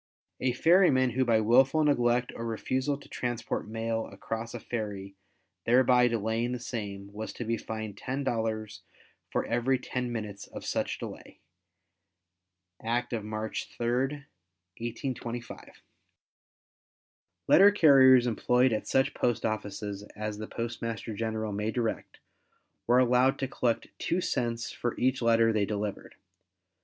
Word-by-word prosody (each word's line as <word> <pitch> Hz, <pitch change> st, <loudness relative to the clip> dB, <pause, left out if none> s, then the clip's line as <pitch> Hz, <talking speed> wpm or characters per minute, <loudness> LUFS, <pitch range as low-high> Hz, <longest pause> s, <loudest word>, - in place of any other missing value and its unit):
A 125 Hz, -1 st, +1 dB
ferryman 145 Hz, -4 st, +4 dB
who 130 Hz, +3 st, +1 dB
by 115 Hz, -3 st, +3 dB
wilful 130 Hz, +7 st, +4 dB
neglect 125 Hz, -4 st, +2 dB
or 115 Hz, -, -5 dB
refusal 130 Hz, +5 st, -1 dB
to 145 Hz, -, -15 dB
transport 120 Hz, -3 st, -3 dB
mail 115 Hz, 0 st, -2 dB
across 115 Hz, +3 st, -6 dB
a -, -, -4 dB
ferry 100 Hz, -4 st, -5 dB, 0.5 s
thereby 125 Hz, 0 st, +5 dB
delaying 115 Hz, +1 st, -1 dB
the 125 Hz, -, -3 dB
same, 100 Hz, -4 st, -6 dB
was 110 Hz, +1 st, -5 dB
to 120 Hz, -, -6 dB
be 115 Hz, +1 st, 0 dB
fined 110 Hz, -2 st, -6 dB
$10 110 Hz, -5 st, -2 dB, 0.5 s
for -, -, -1 dB
every 125 Hz, +3 st, +1 dB
ten 125 Hz, -1 st, -4 dB
minutes 105 Hz, -4 st, -5 dB
of -, -, -9 dB
such -, -, -1 dB
delay. -, -, -9 dB, 1.4 s
(Act 120 Hz, +2 st, -1 dB
of 110 Hz, -3 st, -2 dB
March 110 Hz, +1 st, -4 dB
3, 130 Hz, +4 st, -1 dB, 0.5 s
1825.) 120 Hz, 0 st, -6 dB, 1.6 s
Letter 200 Hz, +2 st, +8 dB
carriers 135 Hz, -9 st, +7 dB
employed 125 Hz, +2 st, +2 dB
at 110 Hz, -, -2 dB
such 135 Hz, +1 st, +2 dB
post 120 Hz, -2 st, 0 dB
offices 105 Hz, -2 st, -3 dB
as 105 Hz, 0 st, -4 dB
the 110 Hz, -, -5 dB
Postmaster 115 Hz, -2 st, -4 dB
General 110 Hz, 0 st, -3 dB
may 105 Hz, +2 st, -1 dB
direct, 115 Hz, -1 st, -3 dB, 0.7 s
were 120 Hz, +1 st, +5 dB
allowed 125 Hz, +1 st, +4 dB
to 135 Hz, -, -2 dB
collect 120 Hz, -3 st, -1 dB
2 175 Hz, -, 0 dB
cents 120 Hz, -8 st, -2 dB
for 120 Hz, -, -3 dB
each 130 Hz, +1 st, +1 dB
letter 115 Hz, -1 st, +4 dB
they 105 Hz, -2 st, +2 dB
delivered. 105 Hz, -1 st, -4 dB
115 Hz, 130 wpm, -29 LUFS, 110-125 Hz, 1.6 s, Letter